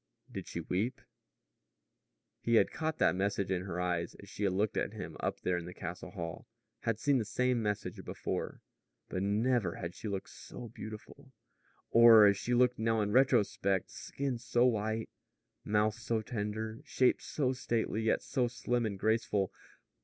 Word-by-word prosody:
Did - - -6
she 85 - -4
weep? 105 +10 -1 1.4
He 115 - +1
had - - +4
caught 160 -1 -2
that - - +4
message 100 0 0
in 90 0 -1
her 90 -2 -4
eyes 90 -1 -1
as 100 - -13
she 105 - -3
had 95 - +1
looked 105 +2 0
at - - -1
him - - -7
up - - -2
there 90 - +1
in 85 - -8
the 90 - -9
castle 90 0 -6
hall 85 -5 -6 0.3
had 115 -2 -1
seen 140 +3 +2
the - - 0
same 125 +2 +1
message 105 -2 -3
before. - - -4 0.5
But 95 - -2
never 105 -1 +1
had 85 0 -5
she 110 - -7
looked 100 -2 -4
so 120 - -9
beautiful 110 +5 -10 0.6
or 115 -2 +9
as 100 -1 +6
she 120 +4 0
looked 125 0 +3
now 115 0 +2
in 105 0 0
retrospect 110 -6 +2
skin 135 -3 -4
so 120 +1 +2
white, 110 -1 0 0.5
mouth 105 0 +2
so 115 -1 -1
tender, 110 +1 -3
shape 130 - +2
so 130 -3 -1
stately, 115 -3 -1
yet 110 - +1
so 125 -2 0
slim 120 -1 -1
and 100 -2 -4
graceful. 105 -2 +1
110 Hz, 170 wpm, -32 LUFS, 100-120 Hz, 1.4 s, or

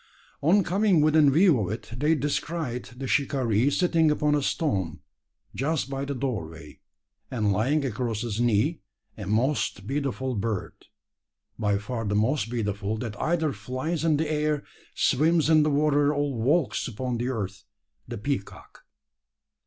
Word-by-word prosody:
On 190 +7 +4
coming 190 -1 +3
within 155 -1 +5
view 165 - +5
of 95 -3 -2
it, 110 +1 -6
they 150 +6 +2
descried 145 -2 -2
the 125 +3 -8
shikaree 130 -3 +1
sitting 165 0 +2
upon 150 0 +2
a 145 - +2
stone, 95 - -1 0.5
just 140 -1 -1
by 135 0 -2
the 140 0 -3
doorway; 85 - -5 0.5
and 110 -6 0
lying 135 +9 +1
across 115 -3 -2
his 115 -1 -2
knee, 120 +8 +1 0.3
a 105 -4 -7
most 110 -2 0
beautiful 130 0 -2
bird 105 -2 -2 0.9
by 105 -1 +1
far 115 +3 -4
the 105 0 -1
most 115 +2 +1
beautiful 105 -2 -2
that 110 -2 -5
either 160 -3 +1
flies 130 +10 -3
in 160 -3 +3
the 160 +1 0
air, 150 -1 0 0.3
swims 160 +3 +3
in 155 -1 +6
the 150 - +2
water, 145 0 +3
or 145 -1 -1
walks 135 +7 +1
upon 125 +1 -3
the 120 - -1
earth 100 -6 -4 0.4
the - - -5
peacock. 105 -1 -5
130 Hz, 150 wpm, -26 LUFS, 110-150 Hz, 0.9 s, in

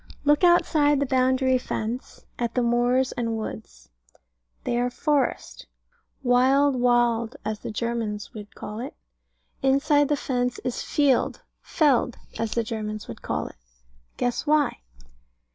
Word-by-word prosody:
Look 295 +3 +4
outside 305 -5 +4
the 280 - +1
boundary 260 0 +2
fence, 235 +1 -5
at 235 -1 -2
the 250 - +2
moors 245 +2 +2
and 230 -2 -2
woods; 220 0 -8 0.7
they 240 - 0
are 245 0 +1
forest, 285 +2 -1 0.6
Wild 265 +3 +4
"Wald," 240 -1 +2
as 215 -1 -2
the - - -6
Germans 220 -2 -3
would 210 -2 -10
call 210 +1 -7
it. 260 +4 -6 0.7
Inside 285 +2 +3
the 295 - +2
fence 250 -2 -1
is 250 -1 -2
Field 280 -4 +1 0.2
"Feld," 270 -6 +2 0.2
as 225 -1 -1
the 235 - 0
Germans 215 -1 -5
would 115 - -9
call - - -2
it. - - -10 0.6
Guess 245 +4 -1
why? 300 -2 +2
245 Hz, 135 wpm, -25 LUFS, 230-275 Hz, 0.7 s, Look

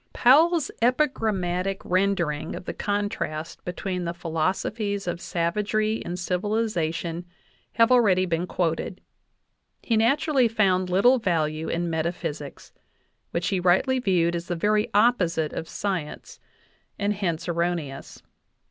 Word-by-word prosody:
Powell's 315 +5 +4
epigrammatic 200 -8 0
rendering 180 -5 0
of - - -8
the - - -4
contrast 205 -6 -3
between 180 0 -3
the 170 0 -3
philosophies 195 +5 -2
of 175 -1 -3
savagery 210 +5 -1
and 175 +1 -4
civilization 180 -3 -1 0.5
have 230 +1 +4
already 200 -7 +4
been 170 0 -1
quoted. 175 +1 -2 0.8
He 230 - +1
naturally 260 +3 +3
found 190 -5 +1
little 245 +8 +4
value 160 -5 -1
in 170 +1 -1
metaphysics, 160 -3 -4 0.6
which 170 0 -1
he 190 - 0
rightly 185 +9 +3
viewed 175 -7 +1
as 170 +1 -4
the 175 - -2
very 210 +5 +1
opposite 180 -9 +2
of 160 - -5
science, 185 -7 -4 0.6
and 205 +1 0
hence 180 -4 -2
erroneous. 170 -5 -3
185 Hz, 120 wpm, -25 LUFS, 170-215 Hz, 0.8 s, Powell's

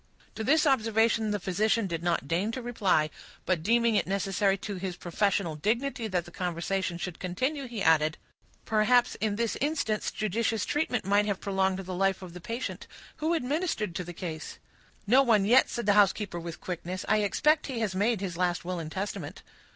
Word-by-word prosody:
To 220 - -5
this 305 +6 +4
observation 225 -4 +2
the 205 0 -1
physician 215 +5 +1
did 170 -3 -3
not 170 -5 0
deign 180 +8 0
to 255 - -4
reply; 190 -10 +1 0.3
but, 180 -4 +1
deeming 235 +5 +3
it 210 - +1
necessary 195 0 +1
to 200 0 -5
his 185 -1 -4
professional 175 -1 0
dignity 230 - -1
that 180 -4 -1
the 175 - -12
conversation 180 +1 -2
should 175 0 -5
continue, 260 - -2
he 230 -4 -4
added,— 155 -1 +3 0.5
"Perhaps, 230 +3 +3
in 210 -2 0
this 230 0 -1
instance, 280 -8 0
judicious 220 +1 -1
treatment 270 -8 -1
might 205 +1 +3
have 200 -2 -1
prolonged 190 -1 0
the 190 -1 -6
life 195 +1 0
of 175 -2 -9
the 180 - -9
patient. 230 +8 -5 0.3
Who 320 +3 0
administered 280 - -1
to 180 - -3
the 175 - -7
case?" 165 -2 -6 0.5
"No 250 +6 +6
one 220 -7 +3
yet," 240 +5 +5
said 235 - -3
the 205 - +4
housekeeper, 200 -2 +2
with 170 -1 -7
quickness. 180 +1 -5
"I 215 - +4
expect 300 +9 +2
he 265 -4 -4
has 210 -4 -1
made 205 +2 +1
his 180 -4 -4
last 175 -1 0
will 180 -1 -3
and 160 -1 -6
testament." 195 -4 -5
200 Hz, 190 wpm, -28 LUFS, 180-230 Hz, 0.5 s, No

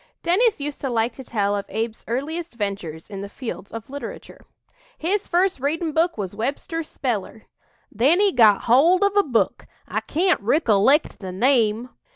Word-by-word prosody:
'" - - -53
Dennis 400 +5 +3
used 285 0 -5
to 270 - -2
like 230 0 0
to 265 - -10
tell 205 -4 0
of 200 - -4
Abe's 225 +1 -3
earliest 300 +6 -3
ventures 195 -7 -4
in 195 -2 -7
the 200 - -6
fields 225 -4 -7
of 225 -1 -7
literature: 280 +1 -9 0.5
"His 385 +5 -1
first 360 -3 +1
readin' 315 +4 -1
book 330 +1 +1
was 195 -3 -4
Webster's 285 +8 -3
speller. 225 -4 -4 0.5
Then 270 - +3
he 405 -1 +4
got 220 -5 +5
hold 325 - +4
of 400 0 +2
a 405 - +6
book 250 - -1 0.2
I - - -1
can't 350 - +1
rickilect 240 +3 +3
the 190 -2 -6
name. 230 +2 +2
255 Hz, 175 wpm, -23 LUFS, 215-330 Hz, 0.5 s, a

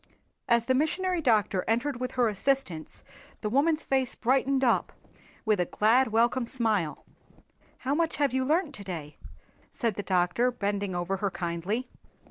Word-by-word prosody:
As 235 -1 +3
the 260 - +2
Missionary 350 +6 0
Doctor 215 -8 +2
entered 240 +3 0
with 255 0 -3
her 245 -2 +2
assistants 210 - -1 0.4
the 210 - -2
woman's 305 +5 +2
face 265 -2 0
brightened 270 +2 +1
up 245 - +2 0.5
with 215 -3 +2
a 180 - +2
glad 230 +9 +3
welcome 235 +2 +1
smile. 215 - -1 0.7
"How 270 +2 -2
much 330 +1 0
have 285 -3 +1
you 260 0 +1
learnt 310 +3 +1
to 205 - -7
day?" 160 -6 -7 0.5
said 230 -3 -1
the 205 - -4
doctor 185 +6 +1
bending 200 -5 -2
over 175 +2 -1
her 200 +1 -1
kindly. 180 +8 -3
235 Hz, 155 wpm, -28 LUFS, 200-270 Hz, 0.7 s, As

